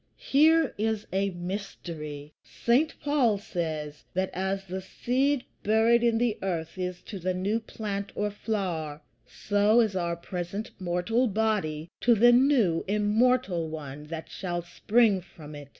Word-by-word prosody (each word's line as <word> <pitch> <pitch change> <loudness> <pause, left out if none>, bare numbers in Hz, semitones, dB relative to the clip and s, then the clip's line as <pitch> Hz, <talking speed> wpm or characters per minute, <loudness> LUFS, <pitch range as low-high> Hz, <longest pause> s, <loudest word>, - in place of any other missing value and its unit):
Here 315 +1 +4
is 220 -1 0
a 195 +1 +1
mystery. 170 -5 -6
St. 265 +7 +1
Paul 275 -8 +3
says, 155 -6 -4
that 185 0 0
as 190 +1 -2
the 190 +1 -5
seed 260 +7 0 0.2
buried 225 +3 +4
in 235 -1 +3
the 235 -2 0
earth 165 -4 -3
is 180 -1 -4
to 200 - -7
the 185 +1 -1
new 200 +5 0
plant 205 -3 -5
or 210 0 -1
flower, 175 -8 -3 0.2
so 205 +2 +2
is 215 -4 +2
our 170 -2 -1
present 180 +4 -5
mortal 185 +8 +1
body 200 -8 0
to 240 -1 +4
the 240 +3 +6
new 240 - +4
immortal 210 -3 +2
one 150 -2 -7
that 160 +1 -6
shall 175 -2 -4
spring 205 +3 +2
from 155 -4 -12
it. 145 -1 -9
195 Hz, 145 wpm, -28 LUFS, 175-225 Hz, 0.2 s, the